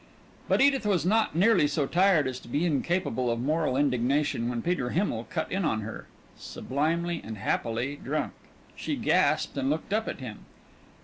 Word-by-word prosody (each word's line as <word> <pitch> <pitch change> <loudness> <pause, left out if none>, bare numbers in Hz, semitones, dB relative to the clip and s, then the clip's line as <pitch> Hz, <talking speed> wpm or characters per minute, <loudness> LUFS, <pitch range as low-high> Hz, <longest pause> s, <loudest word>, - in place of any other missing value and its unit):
But - - +3
Edith 275 -3 +4
was 185 -5 +1
not 215 -3 +2
nearly 190 -3 +4
so 145 -1 0
tired 180 -2 +3
as 130 -1 -4
to - - -15
be 145 +8 0
incapable 155 -5 0
of 115 0 -1
moral 150 0 0
indignation 135 -2 +1
when 120 -2 -3
Peter 170 -8 0
Himmel 125 - -1
cut 160 -3 -3
in 195 +1 0
on 110 -9 0
her, 110 +1 -7 0.3
sublimely 165 +5 -2
and 110 -1 -7
happily 120 +7 -1
drunk. 150 +2 -2 0.4
She - - -3
gasped - - +2
and 135 0 0
looked 160 +6 -2
up 220 +1 0
at - - -4
him. 120 -5 -7
150 Hz, 175 wpm, -28 LUFS, 125-175 Hz, 0.4 s, Edith